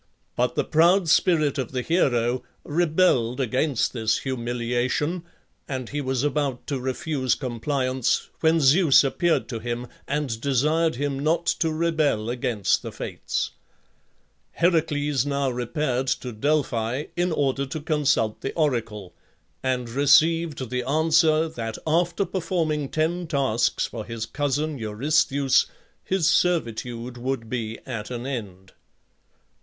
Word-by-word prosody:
But - - 0
the - - +1
proud 170 +2 +3
spirit 155 -4 +3
of 130 -1 -4
the 125 -1 -1
hero 125 -7 +1 0.2
rebelled 150 -7 +2
against 130 +1 0
this 110 -2 +1
humiliation, 125 +6 -1 0.5
and 130 -3 -4
he 145 0 -3
was 130 -1 -1
about 145 -3 -1
to 140 -3 -2
refuse 130 0 -1
compliance, 130 0 -1
when 160 0 +3
Zeus 150 +1 +6
appeared 165 +5 +1
to 115 -3 -4
him 120 +2 -4 0.2
and 140 -6 -2
desired 150 +5 +2
him 140 +1 -2
not 160 +4 +1
to 165 -1 +1
rebel 155 -9 0
against 120 -5 0
the - - -6
Fates. - - -3 1.0
Heracles 150 -5 +1
now 140 -2 0
repaired 125 +1 -2
to 125 -1 -2
Delphi 125 0 0
in 175 0 0
order 140 -3 0
to 155 - -5
consult 145 -8 0
the 135 - -3
oracle, 115 - -1 0.5
and 125 -2 -1
received 145 +1 +3
the 125 0 0
answer 160 +3 +3
that 115 -8 -5
after 170 +4 +1
performing 165 -5 -1
ten 170 +3 -1
tasks 135 -7 +1
for 110 - -6
his 115 0 -5
cousin 145 +3 -2
Eurystheus 135 +5 +2 0.4
his 185 -4 +1
servitude 120 -8 0
would 125 -2 -3
be 115 -3 -3
at 115 -5 -5
an 120 0 -5
end. 100 -8 -6
135 Hz, 130 wpm, -24 LUFS, 120-155 Hz, 1.0 s, Zeus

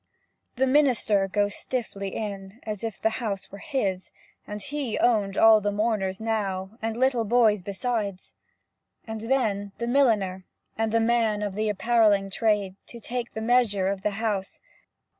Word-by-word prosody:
The 265 - +2
minister 255 -8 +3
goes 205 +1 0
stiffly 200 -6 -4
in 200 0 -6
As 210 -2 -5
if 225 -3 -4
the 220 +2 0
house 200 -4 -4
were 200 - -9
his, 195 -9 -2 0.4
And 210 0 -5
he 270 +1 -3
owned 205 -5 +2
all 220 -1 +7
the 205 0 0
mourners 205 -3 -1
now, 200 -4 -2
And 225 0 -2
little 255 -2 +2
boys 220 -2 +3
besides; 200 0 -3 0.7
And 220 -1 -6
then 205 -7 0
the 235 - -3
milliner, 220 -8 +2 0.3
and 225 0 -1
the 230 - +3
man 225 -2 +1
Of 205 -2 -2
the 215 +2 -1
appalling 210 -2 +2
trade, 205 -3 0
To 235 - -10
take 240 +1 -4
the 220 - -4
measure 220 -5 +2
of 195 -1 -3
the 210 - +1
house. 210 -4 -2
215 Hz, 160 wpm, -26 LUFS, 200-235 Hz, 0.7 s, all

